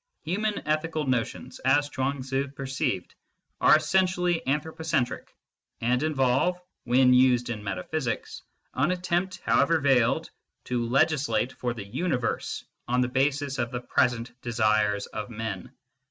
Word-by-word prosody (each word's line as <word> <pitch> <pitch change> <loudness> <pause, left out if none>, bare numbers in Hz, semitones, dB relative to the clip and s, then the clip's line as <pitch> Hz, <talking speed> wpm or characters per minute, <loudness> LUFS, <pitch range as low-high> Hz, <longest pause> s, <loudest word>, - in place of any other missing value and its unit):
Human 200 +1 -2
ethical 155 0 0
notions, 125 -3 -2
as 145 +2 +3
Chuang 135 -1 -2
Tzu 135 +1 -1
perceived, 135 - -3 0.5
are - - +7
essentially 180 +2 +2
anthropocentric, 155 -2 -1 0.5
and 125 +2 +1
involve, 150 +3 +1 0.3
when 125 +1 +5
used 125 -1 +4
in 105 -2 -5
metaphysics, 115 +6 -3 0.3
an - - +1
attempt, 180 0 -1
how - - +4
ever 165 -1 +3
veiled, 135 -5 +2 0.3
to 120 -1 -1
legislate 130 -4 +2
for 125 -1 -3
the 105 -4 -6
universe 125 - -2 0.2
on 125 +1 +2
the 125 - +1
basis 140 +1 0
of 120 -1 0
the 125 0 -4
present 125 -1 +1
desires 105 -3 +1
of 105 - -6
men. 115 -1 -5
130 Hz, 130 wpm, -27 LUFS, 120-155 Hz, 0.5 s, are